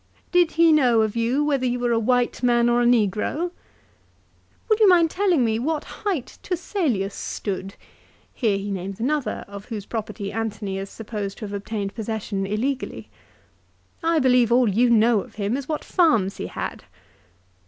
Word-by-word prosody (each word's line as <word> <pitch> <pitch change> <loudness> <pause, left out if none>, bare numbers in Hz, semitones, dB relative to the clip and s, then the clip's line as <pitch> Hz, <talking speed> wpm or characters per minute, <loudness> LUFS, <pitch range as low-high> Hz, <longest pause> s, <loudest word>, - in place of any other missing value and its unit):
" - - -37
Did 355 -2 +3
he 330 0 +5
know 245 -7 +4
of 215 0 -2
you 235 +5 +1
whether 280 -3 0
you 245 0 0
were 245 -1 0
a 230 - +3
white 245 +2 +1
man 240 -1 +3
or 240 0 +3
a - - +2
negro? 240 - +1 0.4
" - - -37
" - - -37
Would 435 -2 +2
you 425 -3 +7
mind 340 -3 +5
telling 360 -9 +2
me 220 0 0
what 305 +4 -1 0.2
height 370 - -3
Turselius 310 - -1
stood? 195 -1 -5 0.3
" - - -33
Here 215 -6 +1
he 200 +1 -4
names 195 +1 -5
another 285 +3 -1
of 200 0 -9
whose 215 -4 -6
property 210 -3 -5
Antony 210 -3 -3
is 195 0 -6
supposed 210 -3 -6
to 220 - -6
have 205 - -7
obtained 200 0 -4
possession 215 -3 -3
illegally. 250 +7 -3 0.5
" - - -38
I - - +3
believe 250 -4 +4
all 245 0 +5
you 230 +5 +3
know 230 -1 +4
of - - -14
him 205 +2 -1
is 275 +1 -5
what 305 - -2
farms 225 - +2
he - - -4
had." - - -5
235 Hz, 185 wpm, -23 LUFS, 205-280 Hz, 0.5 s, you